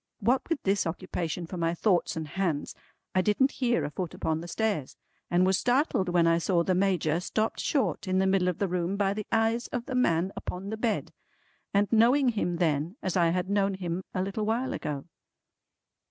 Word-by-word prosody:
What 245 +8 +1
with 330 -4 -1
this 195 -2 +1
occupation 170 0 -3
for 180 +2 -7
my 165 0 0
thoughts 180 -1 +1
and 160 -1 -4
hands, 170 -4 -2 0.4
I 185 - +3
didn't 210 +8 +2
hear 245 -2 0
a 145 - -4
foot 180 +2 -4
upon 160 0 -1
the 170 - -7
stairs, 195 - -2 0.3
and 175 +1 +3
was 190 0 +3
startled 245 - +1
when 175 -1 +3
I 165 0 +4
saw 170 0 +2
the 185 - +1
Major 180 -4 +1
stopped 215 +4 -1
short 275 -8 0
in 185 0 +1
the 190 - +3
middle 190 -1 +2
of 180 - 0
the 200 - 0
room 180 +2 -1
by 200 -1 +1
the 210 0 -5
eyes 225 +1 +1
of 245 -1 -4
the - - -5
man 185 -7 +2
upon 195 +3 -5
the 220 - -3
bed, 220 -1 -1 0.6
and 200 +1 +3
knowing 245 +4 +5
him 205 -6 -1
then, 165 +1 0
as 185 - -1
I 170 -2 +4
had 180 +2 -1
known 200 -1 +1
him 180 -1 -3
a 185 - -1
little 200 +3 -3
while 230 +5 0
ago. 145 -2 -4
190 Hz, 205 wpm, -28 LUFS, 170-220 Hz, 0.6 s, knowing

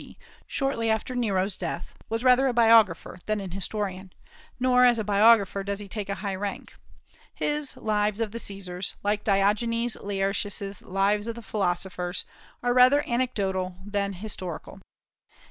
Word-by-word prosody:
D., - - -14 0.3
shortly 270 -5 -1
after 220 +3 -1
Nero's 200 -5 0
death, 170 -1 -5 0.2
was 225 +2 -2
rather 255 +1 +5
a 255 - +1
biographer 225 -7 +4
than 215 -1 0
an 195 -3 -6
historian; 190 -1 -4 0.5
nor 250 0 +4
as 245 -1 +5
a 220 - -1
biographer 205 -1 +4
does 200 0 -3
he 205 0 -8
take 205 0 -5
a 200 - -1
high 200 - -1
rank. 200 +1 -5 0.6
His 295 -1 -2
"Lives 210 -1 0
of 225 -2 -1
the 230 - -5
Caesars," 190 -3 -3
like 205 +1 0
Diogenes 220 +4 +1
Laertius's 200 0 -2
"Lives 200 +3 0
of 230 - -3
the 235 - -9
Philosophers," 180 -2 -2 0.4
are 245 0 +2
rather 255 +4 +6
anecdotical 195 -7 -1
than 200 -1 -1
historical. 185 -3 -5
205 Hz, 150 wpm, -26 LUFS, 195-230 Hz, 0.6 s, rather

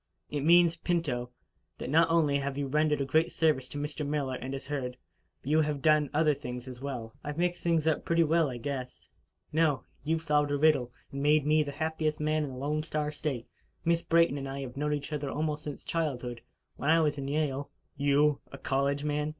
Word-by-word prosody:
"It 145 - -1
means, 170 +2 +5
Pinto, 145 -9 -1 0.5
that - - -5
not 165 +2 +5
only 155 -4 +3
have 140 0 -3
you 145 - -1
rendered 150 +1 +1
a - - 0
great 160 +5 +2
service 150 -6 +1
to - - -7
Mr. 150 +1 -3
Miller 145 -2 -1
and 130 +1 -5
his 135 -1 -5
herd, 130 -3 -3 0.5
but 140 - -3
you 155 +1 +5
have 150 -2 -2
done 155 -2 +4
other 155 0 +3
things 125 -1 -6
as 125 -1 -9
well." 125 -5 -5
"I've 150 +1 -5
mixed 175 0 0
things 165 -2 +1
up 160 -1 +1
pretty 170 0 +3
well, 160 -1 +3
I 125 - -5
guess." 125 0 -5 0.5
"No. 155 -3 +2 0.2
You 160 +3 +1
have 160 - -9
solved 150 -2 +2
a 145 - +1
riddle, 145 -5 +3 0.2
and 140 - -4
made 150 0 +4
me 155 +1 +4
the 145 -1 -2
happiest 155 0 -1
man 155 0 +1
in 145 - -3
the 130 - -8
Lone 150 +3 -1
Star 150 -1 -2
State. 145 -6 -3 0.4
Miss 170 0 +3
Brayton 165 -4 +3
and 135 0 -5
I 135 +1 -4
have 130 -2 -7
known 150 +2 -1
each 145 +1 -6
other 145 -2 -2
almost 150 +1 -2
since 145 -2 -6
childhood. 125 -8 -2 0.4
When 145 - -1
I 165 +1 +6
was 150 -2 +1
in 135 - -4
Yale 145 -1 -1
" - - -45
"You 145 +1 +3
a 140 - -8
college 140 +1 0
man!" 150 0 0
150 Hz, 225 wpm, -30 LUFS, 135-155 Hz, 0.5 s, I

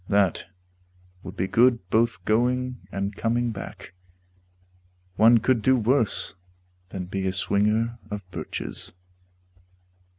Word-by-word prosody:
That 100 -3 +2 0.8
would 95 +1 -9
be 95 - 0
good 115 -1 +3
both 115 -5 +1
going 125 +3 0
and 100 +1 -3
coming 120 +2 0
back. 95 -3 -9 1.2
One 115 +4 +7
could 115 +1 +2
do 130 +4 +4
worse 120 0 +1 0.6
than 95 -2 -5
be 95 +1 -3
a - - +1
swinger 105 +5 +1
of 105 -1 -5
birches. - - -5
110 Hz, 110 wpm, -25 LUFS, 100-120 Hz, 1.2 s, One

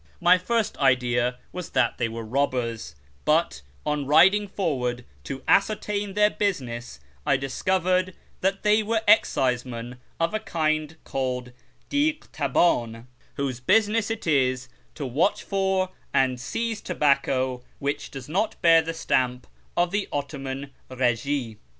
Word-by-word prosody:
My 180 0 +5
first 225 +3 0
idea 125 -2 +2
was 180 -1 -6
that 120 -2 +1
they 115 -2 0
were 115 0 -6
robbers; 120 - -1 0.3
but, 150 - +1 0.2
on 150 -2 -1
riding 190 +8 +5
forward 125 - -2 0.2
to 135 - -6
ascertain 205 -1 +1
their 210 0 +4
business, 125 - -3 0.2
I 140 -3 +3
discovered 185 +6 0 0.2
that 195 +1 0
they 210 +1 +4
were 220 +1 0
excisemen 125 - +2 0.2
of 165 +3 +1
a 215 - 0
kind 155 -5 -1
called 125 -2 -3 0.4
diglitabdn, 160 - +1 0.3
whose 135 -3 -2
business 215 - +2
it 225 -1 -4
is 130 -4 +1 0.3
to 145 - -4
watch 150 - +1
for 190 -1 0 0.2
and 130 -2 +2
seize 225 - -3
tobacco 130 -6 +1
which 140 +1 -3
does 135 -3 -8
not 205 +8 -1
bear 165 -1 +7
the 165 +1 -5
stamp 125 -5 0 0.3
of 175 0 +2
the 205 0 -1
Ottoman 140 -1 -4 0.2
Eegie. 125 -1 -1
145 Hz, 130 wpm, -25 LUFS, 125-190 Hz, 0.4 s, bear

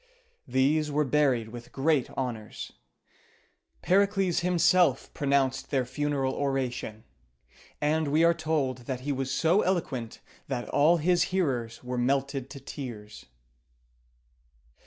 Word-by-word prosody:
These 140 +4 +2
were 150 +1 +1
buried 130 -5 +2
with 120 +1 -10
great 140 -1 +1
honors. 120 -5 -4 1.1
Pericles 195 -1 +2
himself 175 -4 +3
pronounced 135 -1 0
their 135 -3 +1
funeral 135 +1 -1
oration; 130 -6 -2 0.8
and 155 +1 +1
we 155 +3 +3
are 170 0 +5
told 155 -6 -1
that 130 -2 -3
he 145 +3 -2
was 135 -1 -2
so 170 +8 +3
eloquent 145 -11 -2 0.3
that 125 -3 -3
all 160 +4 +4
his 175 +2 +2
hearers 130 -13 -1
were 125 0 -3
melted 135 +1 0
to 140 +1 -9
tears. 120 -6 -8
140 Hz, 115 wpm, -28 LUFS, 130-160 Hz, 1.1 s, are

